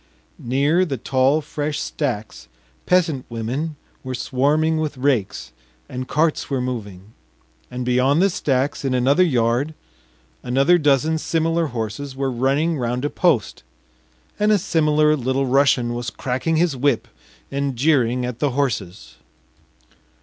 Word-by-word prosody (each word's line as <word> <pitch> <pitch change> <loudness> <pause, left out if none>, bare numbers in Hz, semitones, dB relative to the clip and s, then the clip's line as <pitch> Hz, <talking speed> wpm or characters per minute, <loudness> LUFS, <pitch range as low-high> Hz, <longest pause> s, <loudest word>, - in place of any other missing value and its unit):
Near 140 +8 +2
the 140 -7 -2
tall 130 +5 +2
fresh 150 0 -3
stacks 110 - -4 0.4
peasant 165 -8 +2
women 125 +8 -3 0.3
were 130 -1 -4
swarming 150 +6 +1
with 155 -3 -3
rakes, 115 - -1 0.4
and 130 +1 -6
carts 155 +1 0
were 135 -2 -1
moving, 110 -5 -6 0.6
and 125 0 -5
beyond 125 +4 +2
the 195 +2 +3
stacks 140 -2 -1
in 135 -2 0
another 135 +7 +3
yard 130 -1 +1 0.7
another 135 +8 +3
dozen 150 +2 +2
similar 165 +1 0
horses 125 +3 -5
were 135 0 -1
running 140 +6 0
round 125 +2 -2
a 145 - -1
post, 150 - +1 0.8
and 210 +1 +3
a 210 - +5
similar 155 -5 +2
Little 130 0 -1
Russian 130 -2 +2
was 120 +1 -3
cracking 130 +6 -2
his 165 -2 +2
whip 130 -2 0 0.4
and 140 -1 -2
jeering 125 -3 +2
at 125 -1 -5
the 145 - +1
horses. 110 -10 -3
135 Hz, 135 wpm, -21 LUFS, 125-155 Hz, 0.8 s, a